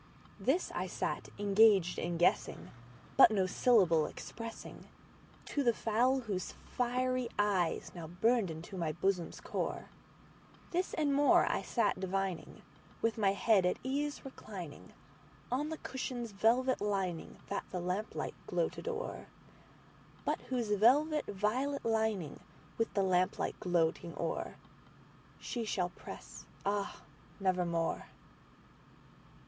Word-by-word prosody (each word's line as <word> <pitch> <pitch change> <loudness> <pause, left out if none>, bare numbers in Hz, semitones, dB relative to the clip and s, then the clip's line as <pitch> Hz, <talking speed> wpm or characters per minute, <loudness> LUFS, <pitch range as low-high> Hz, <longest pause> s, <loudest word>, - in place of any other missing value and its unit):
This 330 +8 +1
I - - -2
sat - - -3
engaged 200 -3 +5
in 170 0 -2
guessing, 175 - +1 0.5
but 270 - +10
no 200 -4 +2
syllable 180 -7 +4
expressingTo 230 0 -8 0.8
the 235 -3 +3
fowl 250 +4 +2
whose 200 -6 -4 0.2
fiery 255 0 +1
eyes 195 -5 +1
now 170 -3 -7
burned 210 +4 +2
into 160 +4 -7
my 160 -2 -1
bosom's 180 0 -1
core; - - -3 0.8
This 360 +2 -1
and 300 -3 +2
more 285 +1 +5
I - - 0
sat - - +1
divining, 190 -2 -3 0.4
with 225 0 +1
my 195 -2 +4
head 200 -1 +4
at 180 - +1
ease 285 +3 -1
recliningOn 220 - -7
the 320 - -4
cushion's 245 -3 -4
velvet 240 +6 +2
lining 190 -5 -2
that 200 - -2
the 180 - -3
lamplight 180 +5 -2
gloated 485 - -1
o'er, 480 0 -4 1.0
But - - 0
whose 240 -5 -1
velvet 290 +9 +4
violet 250 +8 -1
lining 220 -8 0 0.4
with 225 - 0
the 200 - +3
lamp 185 -1 +2
light - - -2
gloating 170 -2 0
o'erShe 225 +6 -6
shall 180 -4 0
press, 180 - -10 0.2
ah, 200 0 -1 0.4
nevermore! 180 -3 0
210 Hz, 115 wpm, -33 LUFS, 180-250 Hz, 1.0 s, but